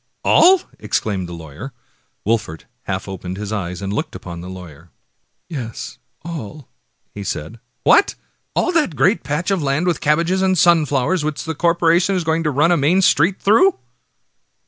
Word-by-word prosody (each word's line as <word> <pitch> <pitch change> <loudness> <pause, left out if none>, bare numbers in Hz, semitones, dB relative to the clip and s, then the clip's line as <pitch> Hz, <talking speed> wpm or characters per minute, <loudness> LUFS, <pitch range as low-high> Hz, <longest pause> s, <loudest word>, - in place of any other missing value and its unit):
all? 370 +1 +6
" - - -27
exclaimed 95 -5 -2
the - - -7
lawyer. 85 - -9 0.5
Wolfert 105 -7 -1 0.2
half 95 0 -3
opened 95 -1 -6
his 105 0 -5
eyes 90 -2 -4
and 100 +1 -3
looked 155 +6 -3
upon 85 -2 -8
the 90 - -8
lawver. 85 -3 -11 0.6
"Yes, 125 -9 -7 0.2
all," 155 -4 -7 0.6
said 80 -4 -4
he. 115 - -15 0.2
" - - -49
What! 400 - +5 0.4
all - - +1
that 310 - +1
great 190 +10 +2
patch 150 +6 -2
of 190 -3 +1
land 140 +4 0
with 175 -3 0
cabbages 170 +5 +1
and 190 -1 +2
sunflowers, 160 -1 +3
which 150 -1 -3
the 160 - -3
corporation 170 +3 +2
is 180 - 0
just - - -7
going 160 +1 +1
to - - +2
run 150 +4 +2
a 175 - +4
main 165 +7 +3
street 175 +3 +3
through?" 345 - +4
150 Hz, 175 wpm, -19 LUFS, -, 0.6 s, all